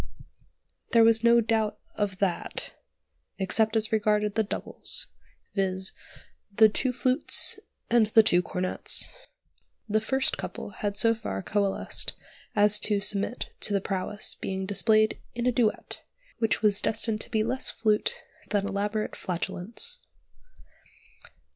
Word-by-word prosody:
There 230 -1 +6
was 225 0 +4
no 235 0 +5
doubt 220 -1 0 0.2
of 200 -3 -2
that, 190 -3 -3 0.6
except 215 +3 +1
as 220 +1 +1
regarded 210 -1 +1
the 220 - +1
"doubles," 210 - -1 0.5
viz., 190 -1 -2 0.6
the 215 +2 +6
two 255 +4 -1
flutes 255 +3 +1 0.3
and 230 -2 +3
the 220 +1 +5
two 180 -4 +3
cornets. 180 - +5 0.7
The 215 0 +1
first 265 +4 -1
couple - - -7
had 205 -1 -4
so 230 +1 +3
far 95 - -5
coalesced 200 -1 -1 0.4
as 210 0 +4
to 210 -1 +1
submit 205 +3 -2
to 205 - 0
the 200 - +2
prowess 195 +2 -3
being 190 0 -5
displayed 215 +2 +2 0.2
in 240 0 -3
a 250 - +3
duet, 230 -3 -1 0.4
which 225 -1 0
was 205 -2 +3
destined 220 -1 -1
to - - -7
be 215 -1 0
less 255 +4 0
flute 215 -2 -1 0.3
than 205 -1 0
elaborate 205 +2 -3
flatulence. 215 - -4
215 Hz, 130 wpm, -27 LUFS, 200-225 Hz, 0.7 s, There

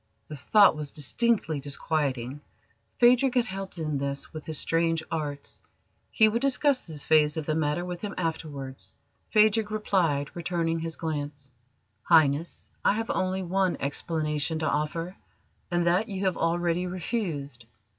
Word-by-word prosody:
The 155 - -6
thought 200 +8 +5
was 150 -1 -3
distinctly 160 - 0
disquieting. 140 -2 -2 0.6
Phadrig 250 +2 +5
had 245 -2 +3
helped 195 -3 -5
in 155 -3 -2
this 140 0 -4
with 155 -1 -8
his 160 -2 -1
strange 165 0 +1
arts. 145 -3 -5 0.5
He 220 - +5
would 230 +2 0
discuss 275 -2 +2
this 155 -3 -7
phase 150 -1 +4
of 155 - -3
the 155 - 0
matter 155 +2 0
with 180 -1 -6
him 205 -2 -5
afterwards. 150 -6 -5 0.3
Phadrig 215 0 +4
replied, 175 -9 0
returning 165 -1 -1
his 165 0 -4
glance: 145 -4 -5 0.5
"Highness, 155 -1 +2
I - - +4
have 225 +1 -2
only 185 0 -1
one 185 +1 0
explanation 150 +2 -1
to 155 0 -1
offer, 165 +5 -2 0.5
and 175 -1 +1
that 180 +6 +2
you 195 -1 -3
have 185 -2 +1
already 175 +1 0
refused. 165 - -4
165 Hz, 145 wpm, -27 LUFS, 150-190 Hz, 0.6 s, thought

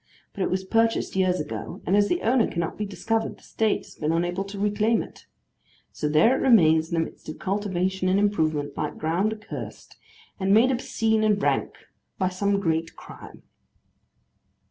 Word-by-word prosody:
But 200 - -6
it - - +1
was 185 +1 -1
purchased 225 +2 +1
years 185 -1 +2
ago, - - -5
and 190 - +2
as 205 0 +4
the 350 - -1
owner 235 0 +3
cannot 170 -1 -3
be 210 - -4
discovered, 225 +3 -2
the - - -23
State 220 -1 -1
has - - -14
been 155 +1 -2
unable 175 +3 0
to 200 +1 -8
reclaim 210 +3 +1
it. - - -15 0.6
So 150 - -3
there 155 - +4
it - - -2
remains, 160 -10 +5
in - - 0
the 165 - +2
midst - - -12
of 155 - -6
cultivation 190 -1 -1
and 190 +2 +3
improvement, 160 -8 0
like 150 - -3
ground 175 +7 0
accursed, 215 -1 -8 0.4
and 195 +1 +3
made 245 +4 +5
obscene 225 -3 0
and 210 -2 +3
rank - - 0 0.4
by 185 -1 +1
some 200 +2 0
great 165 -3 -1
crime. - - -13
195 Hz, 180 wpm, -25 LUFS, 170-215 Hz, 0.6 s, remains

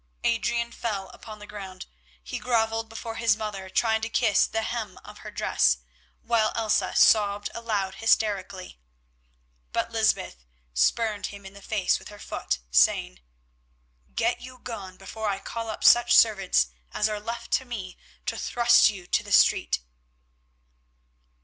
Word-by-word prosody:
Adrian 235 0 0
fell 200 -6 -4
upon 215 -2 -11
the 210 - -11
ground; 195 -3 -9 0.4
he 65 - -5
grovelled 225 -2 0
before 225 0 -7
his 225 -2 +2
mother 205 -3 -5
trying 220 +3 +1
to 225 - -3
kiss 225 -3 +3
the 225 0 -2
hem 220 -5 -4
of - - -12
her - - -9
dress, 65 - +2 0.5
while 225 -2 +2
Elsa 220 -2 0
sobbed 205 -1 +4
aloud 210 -5 -2
hysterically. 200 - 0 0.9
But - - -2
Lysbeth - - 0 0.3
spurned 215 - +1
him 200 -1 -11
in 195 - -10
the 200 - -13
face 200 -3 0
with - - -12
her 205 - -11
foot, - - -3
saying, - - +3 1.0
"Get - - 0
you 255 0 -10
gone 200 -7 -8
before 220 -1 -4
I 195 - -1
call 230 +3 -6
up 220 - -6
such 240 0 +6
servants 195 - +4 0.2
as 210 - +1
are 210 -1 -3
left 230 +3 -6
to 260 - +1
me 200 -7 -6 0.3
to - - -2
thrust 240 -2 +5
you 195 -4 -7
to - - +1
the - - -10
street." 60 - +4
215 Hz, 150 wpm, -26 LUFS, 195-230 Hz, 1.0 s, such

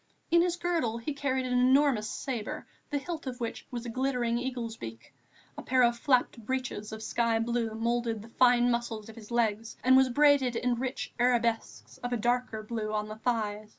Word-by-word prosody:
In 340 0 +6
his 350 0 +1
girdle 335 -10 -1
he 235 +6 -4
carried 265 -2 -1
an 250 - -2
enormous 255 -3 +4
sabre, 240 -6 -4 0.2
the 290 - 0
hilt 310 +1 -5
of 250 0 -5
which 230 -2 -5
was 240 -1 -5
a - - -4
glittering 245 -1 0
eagle's 245 -3 -4
beak. 115 - -9 0.4
A - - -6
pair 255 0 +3
of 240 0 +4
flapped 245 -2 +1
breeches 255 -3 -3
of 220 0 -7
sky 230 0 +1
blue 230 -1 -1
moulded 230 -1 -1
the 230 - -13
fine 245 0 +4
muscles 230 -2 -3
of 220 - -11
his 220 -3 -12
legs 225 -2 0
and 260 +2 +6
was 265 0 +5
braided 280 -2 +4
in 245 +1 +1
rich 255 +2 -4
arabesques 235 -2 0
of 245 - -4
a 245 - +1
darker 240 -1 -1
blue 215 -1 -3
on 210 0 -2
the 215 - -7
thighs. 215 -2 -2
240 Hz, 195 wpm, -29 LUFS, 225-255 Hz, 0.4 s, In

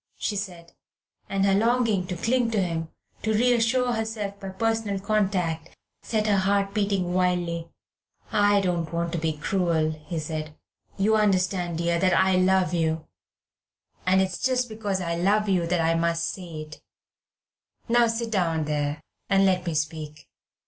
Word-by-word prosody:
she 210 - -2
said, 180 -4 -6 0.6
and 195 0 +1
her 195 - +3
longing 220 -3 +2
to 180 - -3
cling 235 +6 +1
to 220 -2 0
him, 165 -3 -2 0.3
to 220 - 0
reassure 245 +1 +2
herself 220 -3 -3
by 195 - -6
personal 220 0 -1
contact, 190 -6 -1 0.2
set 215 -2 -1
her 205 -2 +3
heart 195 +1 +1
beating 200 -4 0
wildly. 175 -2 0 0.6
"I 205 -1 +4
don't 175 -4 -1
want 170 0 -1
to 170 - -2
be 160 -1 -1
cruel," 165 -1 +1
he 155 +2 -7
said; 155 -1 -4 0.4
"you 210 +3 +3
understand, 185 -4 +1
dear, 170 0 +1
that 185 +1 +3
I 190 0 +4
love 185 0 +3
you, 160 -2 0 1.0
and 190 +1 +5
it's 185 -2 -3
just 255 -1 +1
because 205 -3 -2
I 170 -1 -2
love 205 +4 +2
you 180 -4 +1
that 175 0 +1
I 165 0 +2
must 165 0 +1
say 170 -5 -7
it. 155 0 -11 1.1
Now 240 0 +4
sit 230 0 -2
down 165 -6 +1
there 145 0 -2 0.3
and 195 -1 +4
let 185 -2 +1
me 165 - -1
speak. 150 0 -4
185 Hz, 160 wpm, -25 LUFS, 170-210 Hz, 1.1 s, and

